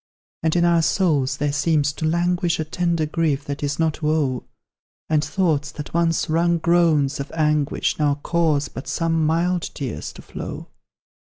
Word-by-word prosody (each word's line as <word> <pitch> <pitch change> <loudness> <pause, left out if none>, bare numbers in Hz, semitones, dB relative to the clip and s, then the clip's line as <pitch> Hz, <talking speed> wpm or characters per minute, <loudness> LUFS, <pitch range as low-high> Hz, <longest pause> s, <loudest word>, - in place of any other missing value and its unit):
Then 160 0 +1
in 175 0 +3
our 170 -1 +4
souls 150 -6 +1
there 145 -1 -1
seems 145 -1 +1
to 155 +1 -2
languish 175 +1 +1
A 155 - -1
tender 170 0 0
grief 150 -3 -1
that 140 0 -5
is 145 0 -1
not 160 -1 0
woe; 150 -5 0 0.7
And 150 -1 +3
thoughts 155 -6 0
that 150 - -8
once 165 -1 +1
wrung 170 +2 +2
groans 160 -5 +2
of 140 - -5
anguish 150 -3 0
Now 145 -2 +2
cause 155 -4 +1
but 130 - -9
some 165 -1 0
mild 175 +2 +1
tears 125 - -5
to - - -12
flow. - - -7
155 Hz, 165 wpm, -22 LUFS, 145-170 Hz, 0.7 s, our